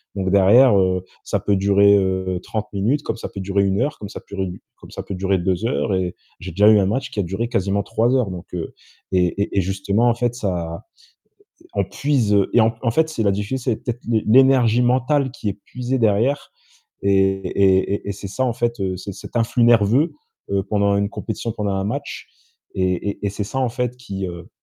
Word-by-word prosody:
Donc 95 Hz, -1 st, -1 dB
derrière, 100 Hz, +3 st, +6 dB
heu, 90 Hz, -1 st, +1 dB, 0.2 s
ça -, -, -1 dB
peut 100 Hz, -1 st, +1 dB
durer, 100 Hz, +1 st, +4 dB
heu, 95 Hz, -1 st, -1 dB
30 105 Hz, -1 st, -4 dB
minutes, 115 Hz, +9 st, 0 dB
comme 115 Hz, -, -3 dB
ça -, -, -5 dB
peut 100 Hz, -, -7 dB
durer 100 Hz, +1 st, +1 dB
1 95 Hz, +4 st, +1 dB
heure, 145 Hz, +3 st, -2 dB
comme 105 Hz, -, -6 dB
ça 105 Hz, -, -9 dB
purée 95 Hz, -1 st, -4 dB
du 90 Hz, -, -8 dB, 0.2 s
comme -, -, -14 dB
ça -, -, -6 dB
peut 100 Hz, -, -6 dB
durer 95 Hz, +1 st, 0 dB
2 90 Hz, +4 st, -1 dB
heures 115 Hz, -4 st, 0 dB
et 90 Hz, -1 st, -1 dB, 0.2 s
j'ai 90 Hz, 0 st, -7 dB
déjà 105 Hz, +5 st, +5 dB
eu 105 Hz, -1 st, +6 dB
un 95 Hz, -, +2 dB
match 130 Hz, +7 st, -2 dB
qui 105 Hz, -, -5 dB
a -, -, +2 dB
duré 95 Hz, +7 st, -3 dB
quasiment 100 Hz, -1 st, 0 dB
3 115 Hz, +3 st, +1 dB
heures 115 Hz, -7 st, +1 dB
donc, 90 Hz, 0 st, -7 dB
heu, 85 Hz, -2 st, -5 dB, 0.4 s
et 90 Hz, -1 st, +3 dB, 0.2 s
et 100 Hz, -, -5 dB
et -, -, +5 dB
justement, 100 Hz, +5 st, 0 dB
en 115 Hz, -, +1 dB
fait, 120 Hz, 0 st, -1 dB
ça, 90 Hz, -7 st, -4 dB, 0.8 s
heu, -, -, -20 dB
on -, -, +1 dB
puise 130 Hz, -8 st, 0 dB, 0.2 s
et 120 Hz, -, +5 dB
en 115 Hz, +1 st, +3 dB
en 115 Hz, -, +2 dB
fait 160 Hz, +5 st, +2 dB
c'est 115 Hz, -8 st, -2 dB
la 100 Hz, -, +3 dB
diffi 105 Hz, +6 st, -2 dB
c'est 120 Hz, -3 st, -1 dB
peut-être 120 Hz, 0 st, -5 dB
l'é 115 Hz, -2 st, +1 dB
l'énergie 125 Hz, -1 st, +5 dB
mentale 130 Hz, +2 st, +2 dB
qui 135 Hz, -5 st, -7 dB
est -, -, -2 dB
puisée 125 Hz, +1 st, -3 dB
derrière 115 Hz, +5 st, +1 dB, 0.5 s
et 100 Hz, 0 st, +2 dB
et 95 Hz, 0 st, +2 dB
et 100 Hz, -, -5 dB
et -, -, -1 dB
c'est 100 Hz, 0 st, -8 dB
ça 130 Hz, +7 st, -1 dB
en 120 Hz, -, 0 dB
fait, 120 Hz, -2 st, -2 dB, 0.2 s
c'est 100 Hz, +2 st, -7 dB
cet -, -, -11 dB
influx 115 Hz, +1 st, +2 dB
nerveux, 120 Hz, +7 st, +4 dB, 0.4 s
heu, 100 Hz, -1 st, +1 dB
pendant 100 Hz, -1 st, +2 dB
une 100 Hz, 0 st, 0 dB
compétition, 115 Hz, +1 st, -4 dB
pendant 105 Hz, -3 st, -2 dB
un 95 Hz, 0 st, -1 dB
match 140 Hz, +7 st, -5 dB, 0.5 s
et 95 Hz, +2 st, 0 dB
et 100 Hz, -, -5 dB
et -, -, 0 dB
c'est 105 Hz, 0 st, -4 dB
ça, 130 Hz, +6 st, -4 dB
en 130 Hz, -2 st, +1 dB
fait, 125 Hz, 0 st, -3 dB
qui, 95 Hz, -6 st, -5 dB
heu, 85 Hz, -1 st, -8 dB
105 Hz, 225 wpm, -21 LUFS, 95-120 Hz, 0.8 s, derrière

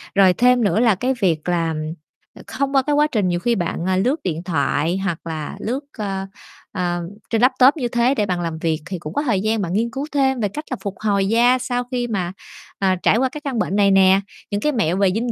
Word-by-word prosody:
Rồi 190 Hz, -2 st, +6 dB
thêm 245 Hz, +4 st, +3 dB
nữa 205 Hz, +2 st, +2 dB
là 230 Hz, -5 st, +4 dB
cái 255 Hz, +7 st, 0 dB
việc 170 Hz, -2 st, +1 dB
là, 165 Hz, -2 st, 0 dB, 0.7 s
không 275 Hz, 0 st, -2 dB
qua 270 Hz, -, +6 dB
cái 290 Hz, +2 st, 0 dB
quá 300 Hz, +1 st, +4 dB
trình, 210 Hz, -9 st, 0 dB
nhiều 175 Hz, -1 st, 0 dB
khi 235 Hz, +5 st, +1 dB
bạn, 175 Hz, -2 st, -2 dB
à, 185 Hz, -, +2 dB
lướt 260 Hz, -, 0 dB
điện 170 Hz, -1 st, -3 dB
thoại 160 Hz, +1 st, 0 dB
hoặc 170 Hz, -5 st, -2 dB
là 155 Hz, -2 st, -5 dB
lướt, 250 Hz, +5 st, -2 dB, 0.2 s
ơ, 195 Hz, -3 st, -3 dB, 0.5 s
ờ 175 Hz, -2 st, -2 dB, 0.3 s
trên 225 Hz, 0 st, +1 dB
laptop 260 Hz, +4 st, +5 dB
như 245 Hz, -4 st, -1 dB
thế 240 Hz, +3 st, +1 dB
để 210 Hz, -, +1 dB
bạn 180 Hz, -3 st, -2 dB
làm 165 Hz, -2 st, -3 dB
việc, 160 Hz, -2 st, 0 dB
thì 185 Hz, -2 st, -5 dB
cũng 155 Hz, +2 st, -7 dB
có -, -, 0 dB
thời 220 Hz, -10 st, 0 dB
gian 215 Hz, 0 st, 0 dB
bạn 175 Hz, -2 st, -3 dB
nghiên 230 Hz, +3 st, +1 dB
cứu 270 Hz, +4 st, -4 dB
thêm 265 Hz, -3 st, +1 dB
về 210 Hz, -, +1 dB
cách 300 Hz, +9 st, -7 dB
là 255 Hz, -, -2 dB
phục 200 Hz, -2 st, -5 dB
hồi 200 Hz, -2 st, +1 dB
da 240 Hz, +3 st, +4 dB
sau 245 Hz, -1 st, -2 dB
khi 245 Hz, -1 st, -1 dB
mà, 185 Hz, -5 st, -2 dB, 0.5 s
à, 190 Hz, -1 st, +2 dB
trải -, -, +4 dB
qua 260 Hz, +1 st, +1 dB
cái 300 Hz, +2 st, -8 dB
căn 265 Hz, -6 st, -3 dB
bệnh 195 Hz, -, -1 dB
này 200 Hz, -1 st, +4 dB
nè, 190 Hz, 0 st, +5 dB, 0.3 s
những 205 Hz, -, -1 dB
cái 300 Hz, -, +1 dB
mẹo 190 Hz, -, 0 dB
về 195 Hz, -1 st, +3 dB
dinh 230 Hz, +4 st, -1 dB
205 Hz, 245 wpm, -20 LUFS, 180-250 Hz, 0.7 s, Rồi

